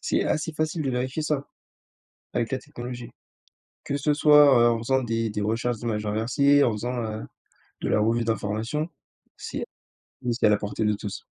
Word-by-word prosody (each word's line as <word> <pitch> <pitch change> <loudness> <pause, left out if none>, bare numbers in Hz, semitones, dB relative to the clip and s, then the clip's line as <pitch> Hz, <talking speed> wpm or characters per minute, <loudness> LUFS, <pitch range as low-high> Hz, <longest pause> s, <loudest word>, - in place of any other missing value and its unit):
c'est - - 0
assez 155 +2 -1
facile 155 +1 -1
de 135 - -1
vérifier 130 +4 -2
ça 150 -2 -1 0.9
avec 120 +1 -1
la 130 - +1
technologie. 125 -3 -8 0.8
Que 140 - -1
ce 150 +1 +1
soit, 145 -5 +6
heu, - - +3
en 115 - +1
faisant 130 +3 +1
des 115 -1 -1
des 105 0 -3
recherches 115 +3 -1
d'images 110 -2 -3
inversées, 140 +7 +3
en 120 - +3
faisant, 120 +3 -3
heu, 110 0 -4 0.6
de - - -1
la - - +3
revue 115 +2 +2
d'information, 115 +7 -2 0.5
si, - - -5 0.7
c'est 120 - +2
à - - +6
la 105 - +5
portée 105 +1 -3
de 105 0 +2
tous. 100 -1 -6
120 Hz, 180 wpm, -25 LUFS, 110-140 Hz, 0.9 s, soit